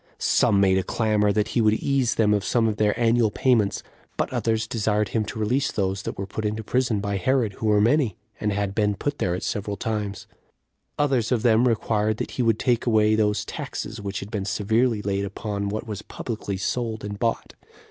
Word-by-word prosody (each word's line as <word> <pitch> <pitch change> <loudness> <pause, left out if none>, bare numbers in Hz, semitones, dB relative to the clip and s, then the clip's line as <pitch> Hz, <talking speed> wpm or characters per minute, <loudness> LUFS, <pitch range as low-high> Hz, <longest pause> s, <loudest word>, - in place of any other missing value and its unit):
Some 100 - +3
made 95 -1 +4
a - - -1
clamor 105 +1 +1
that 105 +2 0
he 120 - +1
would 110 -1 +4
ease 135 -1 +1
them 105 -2 +3
of 100 -1 +1
some 115 +1 +2
of 105 -1 -1
their 105 +1 +1
annual 115 -1 +3
payments; 105 -3 +1 0.3
but - - -1
others 110 -1 0
desired 105 -3 0
him 110 +1 0
to 105 - -7
release 125 +6 0
those 95 -1 -1
that - - -5
were 100 - -3
put 105 +2 -5
into 110 +1 -2
prison 120 -2 0
by 100 -1 -2
Herod, 115 +1 +1
who 110 - -3
were 105 -1 +4
many, 115 - +2 0.2
and 105 - 0
had 100 -1 -1
been 105 -1 +1
put 145 +7 -3
there 90 -1 0
at 90 - -5
several 100 0 -3
times; 105 -3 -3 0.7
others 135 -6 +1
of 120 -3 +1
them 120 +1 +4
required 110 -2 +1
that - - -4
he - - -2
would 115 -3 +3
take 125 -1 0
away 110 -2 +4
those 105 -1 +1
taxes 110 0 -6
which 100 -1 -4
had 100 - -8
been 100 -3 -2
severely 110 +2 +1
laid 100 0 -1
upon 100 0 -3
what 110 +4 -4
was 105 -3 -5
publicly 110 -5 -5
sold 110 +3 -2
and 100 0 -6
bought. 115 -1 -1
110 Hz, 210 wpm, -24 LUFS, 100-115 Hz, 0.7 s, made